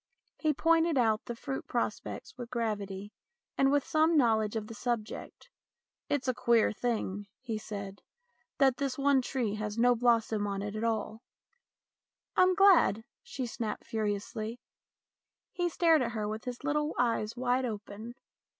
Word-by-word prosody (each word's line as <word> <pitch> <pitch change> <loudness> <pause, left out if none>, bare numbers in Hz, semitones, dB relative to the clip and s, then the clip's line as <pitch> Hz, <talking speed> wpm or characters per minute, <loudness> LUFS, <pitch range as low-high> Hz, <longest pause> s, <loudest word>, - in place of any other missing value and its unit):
He 310 - +2
pointed 330 +1 +3
out 225 -3 +2
the 235 - -5
fruit 270 +3 -5
prospects - - -3
with 245 -2 -7
gravity 205 -4 -3 0.4
and 270 0 +3
with 285 -1 +2
some 315 +1 +3
know 235 -5 +5
ledge 215 0 -2
of 220 -1 -2
the 225 - -9
subject. 235 - -4 0.3
" - - -62
It's 275 -3 0
a 255 - +2
queer 235 -2 +3
thing," 205 -3 -2
he 230 -4 -4
said, 200 -2 -7 0.3
" - - -44
that 265 -3 +4
this 275 -2 -2
one 280 -1 +3
tree 245 -4 -2
has 210 0 -3
got 230 - 0
no 245 0 +5
blossom 225 -3 +2
on 200 0 -3
it 205 +1 -4
at 215 - -3
all." 225 -1 -1 0.6
" - - -63
I'm 370 0 +5
glad," 345 - +5 0.2
she 260 - -5
snapped 225 -2 -4
furiously. 215 +2 -3 0.9
He 350 -1 -1
stared 325 -2 +4
at 235 -2 -1
her 215 -2 -2
with 215 +1 -5
his 250 +1 -6
little 300 +1 0
eyes 230 -2 0
wide 255 +1 +1
open. 215 +1 -6
235 Hz, 170 wpm, -31 LUFS, 215-270 Hz, 0.9 s, know